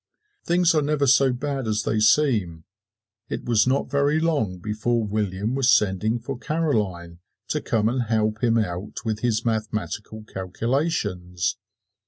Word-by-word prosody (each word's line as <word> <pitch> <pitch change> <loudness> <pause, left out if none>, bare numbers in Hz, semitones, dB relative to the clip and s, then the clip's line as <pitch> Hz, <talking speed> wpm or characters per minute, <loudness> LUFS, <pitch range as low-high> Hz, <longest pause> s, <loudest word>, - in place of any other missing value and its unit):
Things 175 -1 +3
are 155 - +3
never 145 -1 +1
so 135 0 +5
bad 135 0 -3
as 110 0 0
they 110 - 0
seem. 105 - +2 0.7
It - - -4
was 115 -1 +3
not 135 +2 0
very 145 +2 +2
long 145 - 0
before 110 +4 -1
William 105 +1 -2
was 135 -1 +2
sending 105 +1 +2
for 120 +2 -6
Caroline 105 - -2 0.3
to - - -1
come 110 -1 +1
and 125 +2 0
help 110 0 0
him 115 -1 +3
out 100 +1 -3
with 110 -1 -1
his 115 -1 0
mathematical 110 -1 -3
calculations. 95 - -2
110 Hz, 145 wpm, -24 LUFS, 105-135 Hz, 0.7 s, so